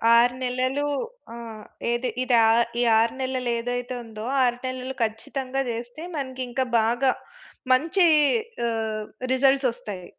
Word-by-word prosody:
6 245 +1 +5
నెలలు, 255 +3 0 0.5
ఆ! - - -8 0.6
ఏది 240 +1 0
ఇది 250 -2 +2
ఆ - - +5 0.3
ఈ - - +3 0.2
6 230 0 +2
నెలలు 255 -1 -2
ఏదైతే 245 +1 -3
ఉందో, 220 -1 -8 0.2
6 245 -1 +2
నెలలు 255 +1 -4
ఖచ్చితంగా 255 +4 -2
చేస్తే 240 +6 -6
మనకి 260 -2 -4
ఇంకా 260 +1 0
బాగా, 240 +4 +2 0.6
మంచి 335 +7 +3 0.6
ఆహ్, 220 -1 -2 0.3
రిజల్ట్స్ 270 0 +3
వొస్తాయి. 190 -6 -7
250 Hz, 130 wpm, -25 LUFS, 235-260 Hz, 0.6 s, 6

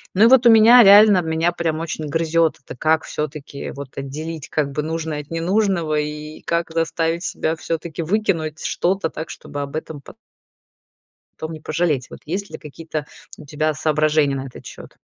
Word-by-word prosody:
Ну 210 - +5
и - - +8
вот 255 -1 +5
у 235 - +9
меня 230 +3 +8
реально, 205 -1 +7
меня 165 +1 0
прям 165 -2 -2
очень 155 -1 -4
грызет 165 +1 +1
это: - - -9
как 160 +2 +2
всё-таки, 150 -2 -6
вот, 140 -1 -10
отделить, 150 +3 -6
как 145 -2 -1
бы, 150 +2 -2
нужное 160 -2 -3
от 145 - -19
ненужного 170 -3 0
и 150 +1 -6
как 170 0 -1
заставить 165 +1 -1
себя 160 -1 -2
всё-таки 165 0 -4
выкинуть 165 -5 -1
что-то 180 -2 0
так, 160 - -7
чтобы 145 - -7
об 140 +1 -6
этом 155 -1 -5
по - - -14 1.2
том 160 +1 -5
не 155 - -8
пожалеть? 150 -7 -1
Вот - - -11
есть 195 +5 -4
ли - - -6
у - - -20
тебя 150 -3 -11 0.8
какие-то 155 0 0
соображения 155 -1 +1
на 135 0 -5
этот 125 - -12
счет? - - -11
160 Hz, 180 wpm, -21 LUFS, 150-170 Hz, 1.2 s, у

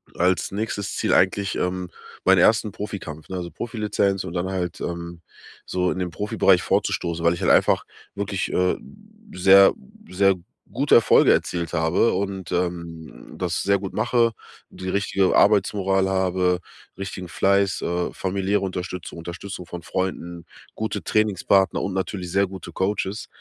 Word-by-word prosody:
als 90 +1 +1
nächstes 105 0 -3
Ziel - - 0
eigentlich, 100 +1 +2
ähm, 90 0 -2 0.3
meinen 95 0 +5
ersten 105 +2 +4
Profikampf, 85 -8 -7
ne? 95 - -4
Also 85 -1 -5
Profilizenz 105 -4 -1
und 80 - -7
dann 90 +1 -2
halt, 90 -3 -3
ähm, 85 0 -5 0.4
so 90 0 0
in 95 - -3
den 90 -1 -2
Profibereich 105 +5 +2
vorzustoßen, 85 -1 -1
weil 85 - +5
ich - - -9
halt - - +3
einfach - - +4 0.3
wirklich, 100 -1 -2
äh, 90 0 +2 0.6
sehr, 95 +2 +7 0.4
sehr 95 +1 +3 0.4
gute 140 +4 +3
Erfolge 115 - +6
erzielt 85 -1 -2
habe 80 +6 +2
und, 95 -3 -3
ähm, 85 -2 -3 0.2
hm, - - -11
das 90 -1 -2
sehr 100 0 +2
gut 95 -1 -6
mache 115 -2 +2 0.4
und - - -14
die 95 - -3
richtige 100 0 +1
Arbeitsmoral 95 -2 +3
habe, 90 -1 +1 0.4
richtigen 95 -2 -6
Fleiß, 100 +2 +2
äh, 85 0 -2
familiäre 95 +1 -1
Unterstützung, 90 -2 -5
Unterstützung 90 +2 -7
von 90 0 -8
Freunden, 85 -1 -4 0.3
gute 110 0 -3
Trainingspartner 100 -2 +2
und 95 - -3
natürlich 95 -2 -3
sehr 100 +1 +2
gute 95 0 -9
Coaches. 100 +1 -2
95 Hz, 150 wpm, -23 LUFS, 90-100 Hz, 0.6 s, sehr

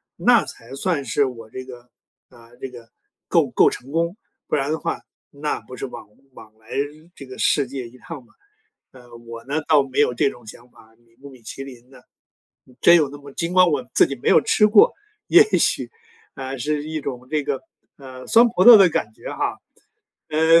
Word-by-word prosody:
那 - - +3
才 115 +3 -12
算 145 0 -1
是 140 - +1
我 115 -4 -8
这 130 +3 -8
个 125 -1 -13 0.4
啊， 115 -1 -19
这 135 - -5
个 120 -2 -14 0.4
够 - - +2
够 - - +4
成 130 +2 -9
功， 170 +3 -1 0.3
不 - - -1
然 140 +1 -1
的 160 - -2
话， 165 - -4 0.3
那 150 +1 -3
不 130 - -12
是 - - -4
枉 125 - -11 0.3
枉 110 -3 -15
来 110 0 -26 0.5
这 140 - -11
个 130 -1 -11
世 140 -3 +2
界 130 -2 -6
一 120 +2 -17
趟 155 -1 -10
嘛。 - - -27 0.6
呃， 120 -2 -16
我 115 0 -11
呢， 145 +3 -2
倒 150 -3 +4
没 135 +1 -4
有 135 -4 +3
这 140 +3 +2
种 120 -2 -16
想 120 +3 -13
法， 110 -1 -21
米 115 -1 -31
不 140 - -11
米 130 -3 -16
其 135 +5 -8
林 125 -2 -13
呢， - - -16 0.8
真 170 - +7
有 155 -4 +3
那 145 - -10
么 140 0 -13
尽 170 +1 -3
管 185 -1 +5
我 135 -5 -1
自 - - +5
己 140 - -5
没 120 - -2
有 - - +6
吃 210 - +3
过， 210 -1 +5 0.3
也 - - +7 0.2
许， - - 0 0.4
啊， 135 0 -6
是 150 +3 -2
一 155 0 -4
种 130 -3 -7
这 155 -1 -1
个， - - -3 0.4
呃， 130 -2 -11
酸 235 +1 +6
葡 215 -5 0
萄 235 -2 +11
的 190 -3 +6
感 110 -8 -3
觉 - - -10
哈， - - -3 0.7
呃， 160 +2 +4
135 Hz, 225 characters per minute, -21 LUFS, 125-155 Hz, 0.8 s, 萄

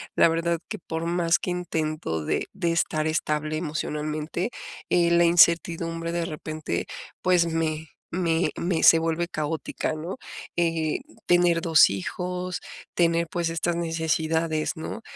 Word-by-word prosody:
la 170 - +6
verdad 165 0 0
que - - -5
por 165 0 -4
más 170 0 +2
que - - -4
intento 155 - -2
de - - -1
de 175 -4 0
estar 155 -1 0
estable 155 -1 -1
emocionalmente, 155 +4 -3 0.4
eh, 170 -1 +3
la 170 0 +5
incertidumbre 170 -1 +3
de 170 -1 0
repente, 155 - -4 0.4
pues, 180 -2 +3
me 160 -1 -2 0.2
me 170 -1 +1
me 170 -1 0
se 165 - +8
vuelve 165 +1 -1
caótica, 155 -1 -3
¿no?, 165 +7 -5 0.4
eh, 165 -2 0 0.3
tener 175 -1 +4
2 160 -3 +6
hijos, 180 - -4 0.3
tener, 170 -1 +2
pues, 170 -2 -1
estas 170 +1 -1
necesidades, 160 -1 0
¿no?, 225 +8 -5
165 Hz, 135 wpm, -25 LUFS, 155-170 Hz, 0.4 s, se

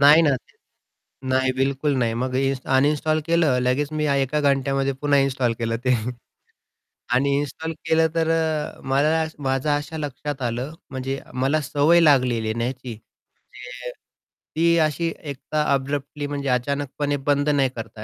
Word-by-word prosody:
नाही 150 +3 +8
ना 155 - +4
ते - - -18 0.7
नाही, 130 0 +2
बिलकुल 135 +2 0
नाही. 115 -2 +1
मग 125 +2 -2
हे 135 +1 +2
इन्स्ट 135 -1 -4
अनइन्स्टॉल 150 +3 +2
केलं, 165 -6 +3
लगेच 135 +4 0
मी 155 0 0
अ, 140 - +2
एका 140 +2 +1
घंट्यामध्ये 135 -1 +1
पुन्हा 145 +1 +1
इन्स्टॉल 130 -3 +1
केलं 115 -1 -1
ते. 125 0 +4 1.2
आणि 140 +2 +2
इन्स्टॉल 160 +3 -4
केलं 160 0 +3
तर 165 -1 +1
अ, 160 -2 -1
मला 155 +4 +2 0.2
माझं 135 +3 0
अशा 145 +2 -5
लक्षात 145 -1 -5
आलं, 120 +5 -2 0.2
म्हणजे 135 +1 -4
मला 135 +5 +1
सवय 150 +4 +3
लागलेली 125 -8 +3
ना 115 0 -1
ह्याची, 125 -1 -5 0.5
म्हणजे 125 0 -9 0.6
ती 170 +1 +3
अशी 165 +2 -1 0.2
एक 140 - -8 0.2
अब्रप्टली 145 0 -1
म्हणजे 140 -1 -4
अचानकपणे 140 +3 -1
बंद 145 0 +2
नाही 140 -3 +3
करता 110 -2 -7
140 Hz, 155 wpm, -23 LUFS, 130-150 Hz, 1.2 s, नाही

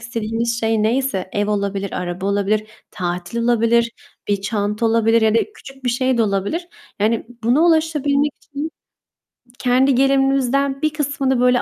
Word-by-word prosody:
istediğimiz 230 0 -2
şey 225 -1 +1
neyse; 225 -4 0
ev 205 0 0
olabilir, 200 -1 -2
araba 180 +1 -4
olabilir, 205 +1 +1 0.3
tatil 175 +4 -4
olabilir, 235 0 +2 0.4
bir 200 -1 +1
çanta 210 +1 -1
olabilir 225 0 +3
ya 220 0 +3
da - - +5 0.2
küçük 270 - -14
bir 245 - +2
şey 255 0 +1
de - - +4
olabilir. 210 - -1 0.3
Yani, 220 +3 0 0.2
buna 245 +6 +3
ulaşabilmek 295 -3 +2
için 290 +3 -5 0.9
kendi 255 +1 +3
gelirimizden 275 +1 +2
bir 310 - +2
kısmını 275 -3 0
böyle 250 0 +4
235 Hz, 145 wpm, -20 LUFS, 210-270 Hz, 0.9 s, da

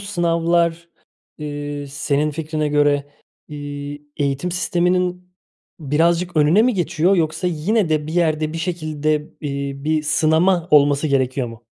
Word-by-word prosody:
sınavlar, 170 -3 0 0.5
ııı, 145 -1 -5
senin 145 +1 -1
fikrine 155 0 -2
göre, 145 -1 +2 0.4
iii, 145 0 -7
eğitim 140 +4 -1
sisteminin, 180 0 0 0.5
birazcık 165 +4 +1
önüne 155 +8 +5
mi 250 0 +2
geçiyor, 175 +1 +1
yoksa 160 +1 0
yine 180 +4 0
de 155 -1 0
bir 155 - -5
yerde, 155 -3 +1
bir 165 - -4
şekilde, 155 -3 -1
ııı, 140 -2 -6
bir 155 0 +1
sınama 160 +4 +2
olması 145 0 +4
gerekiyor 130 -3 0
mu? 115 +1 -12
155 Hz, 125 wpm, -20 LUFS, 145-170 Hz, 0.5 s, önüne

